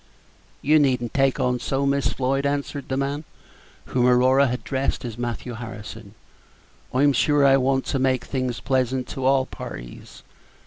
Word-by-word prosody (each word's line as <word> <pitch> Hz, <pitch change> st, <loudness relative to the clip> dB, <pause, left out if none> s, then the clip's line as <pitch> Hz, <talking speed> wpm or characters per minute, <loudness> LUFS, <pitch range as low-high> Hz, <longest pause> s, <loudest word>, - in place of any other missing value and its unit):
"You 155 Hz, +2 st, +5 dB
need 135 Hz, -4 st, +3 dB
n't 120 Hz, -, -5 dB
take 135 Hz, -1 st, +2 dB
on 125 Hz, 0 st, +1 dB
so, 135 Hz, +2 st, -1 dB
Miss 140 Hz, 0 st, +1 dB
Floyd," 135 Hz, +1 st, -1 dB
answered 140 Hz, 0 st, -3 dB
the 130 Hz, -, -1 dB
man, 140 Hz, +2 st, -2 dB, 0.6 s
whom 125 Hz, -1 st, +1 dB
Aurora 130 Hz, +2 st, +4 dB
had 125 Hz, +1 st, -3 dB
addressed 135 Hz, -1 st, -2 dB
as 115 Hz, -3 st, -5 dB
Matthew 120 Hz, +1 st, -4 dB
Harrison; 110 Hz, -2 st, -9 dB, 0.8 s
"I'm 140 Hz, +2 st, +3 dB
sure 145 Hz, +2 st, +3 dB
I 135 Hz, 0 st, +6 dB
want 135 Hz, 0 st, +1 dB
to 135 Hz, -, -1 dB
make 130 Hz, -1 st, +1 dB
things 130 Hz, -3 st, -3 dB
pleasant 130 Hz, -1 st, 0 dB
to 130 Hz, -, -4 dB
all 135 Hz, 0 st, +3 dB
parties. -, -, -10 dB
130 Hz, 165 wpm, -23 LUFS, 125-140 Hz, 0.8 s, I